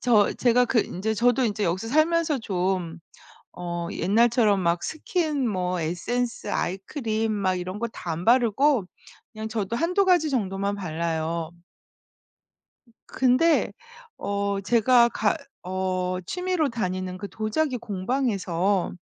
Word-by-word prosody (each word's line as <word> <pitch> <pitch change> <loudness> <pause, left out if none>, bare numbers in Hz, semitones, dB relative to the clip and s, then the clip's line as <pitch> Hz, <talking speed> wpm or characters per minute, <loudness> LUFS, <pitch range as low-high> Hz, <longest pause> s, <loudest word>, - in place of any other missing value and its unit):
저 220 -5 +4
제가 245 0 +3
그 235 - +1
인제 220 +4 -2
저도 245 +3 +3
인제 210 -2 -1
여기서 185 +6 -1
살면서 310 +1 +2
좀 180 -5 -2 0.6
어 175 -1 -4
옛날처럼 220 -1 +3
막 170 0 +1
스킨 310 -5 -1
뭐 180 -3 -1
에센스, 230 +10 -2
아이크림 220 - -2
막 195 -3 0
이런 185 +2 -4
거 235 - -1
다 180 - -8
안 165 +3 -4
바르고 240 0 +3 0.5
그냥 220 -1 -6
저도 220 -1 -2
1-2 360 +8 +2
가지 340 -5 +3
정도만 200 -4 -1
발라요. 165 -2 -2 1.6
근데 265 +6 +3 0.4
어 200 0 -2
제가 235 +3 +4
가 220 +1 0 0.3
어 185 -1 -1
취미로 360 -4 0
다니는 185 -5 -3
그 200 - -6
도자기 250 +5 -1
공방에서 200 -4 -1
215 Hz, 235 characters per minute, -25 LUFS, 185-245 Hz, 1.6 s, 저